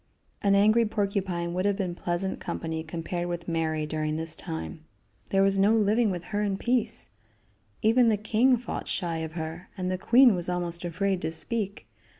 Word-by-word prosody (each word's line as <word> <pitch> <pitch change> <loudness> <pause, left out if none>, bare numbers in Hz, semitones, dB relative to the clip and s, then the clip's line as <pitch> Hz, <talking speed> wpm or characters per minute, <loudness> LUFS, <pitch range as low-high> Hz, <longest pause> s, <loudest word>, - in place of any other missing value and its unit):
An 200 -1 +3
angry 215 +3 +5
porcupine 195 -5 -1
would 185 +2 -1
have 205 -1 +2
been 190 -3 -2
pleasant 175 +2 -2
company 160 -2 -4
compared 170 +2 -4
with 175 -1 -4
Mary 160 -2 -1
during 155 0 -2
this 160 0 -3
time. 160 -1 -6 0.5
There 195 0 +3
was 195 0 +3
no 205 +3 +5
living 215 +1 +3
with 175 -3 -3
her 205 - +1
in 200 -2 0
peace. 235 0 -1 0.7
Even 230 +2 +5
the 215 - +2
king 225 +5 +3
fought 240 - -5
shy 170 -2 -2
of 160 -1 -5
her, 165 +1 -6
and 185 -1 -2
the 185 - -2
queen 245 +3 +6
was 180 -1 -1
almost 175 -1 -2
afraid 190 +2 -1
to 160 - -2
speak. 205 +4 -3
185 Hz, 180 wpm, -27 LUFS, 170-210 Hz, 0.7 s, queen